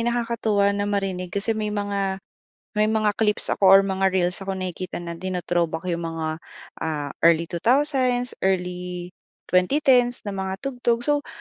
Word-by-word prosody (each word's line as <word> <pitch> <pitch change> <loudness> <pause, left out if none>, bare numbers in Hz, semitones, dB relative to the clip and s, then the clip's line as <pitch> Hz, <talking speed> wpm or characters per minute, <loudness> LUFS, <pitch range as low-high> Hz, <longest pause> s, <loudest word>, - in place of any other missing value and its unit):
nakakatuwa 230 -4 +1
na 205 0 -1
marinig 195 -3 -2
kasi 200 +5 -1
may 215 -1 -2
mga 200 -2 -2 0.5
may 210 - +4
mga 215 -1 +2
clips 210 -2 +1
ako 195 - +2
or 195 +1 +9
mga 190 -1 0
reels 180 -1 +1
ako 195 0 -4
nakikita 185 -1 -5
na 170 -1 -6
tino-throwback 175 -2 -1
yung 170 -1 -2
mga 160 -1 -3 0.4
ah, 150 -3 -3 0.2
early 170 0 +3
2000s, 250 - +1 0.2
early 180 -1 -2 0.4
2010's 245 +5 +3
na 205 - -4
mga 190 -1 -3
tugtog. 245 -3 0
So 290 +2 0
195 Hz, 145 wpm, -24 LUFS, 180-220 Hz, 0.5 s, or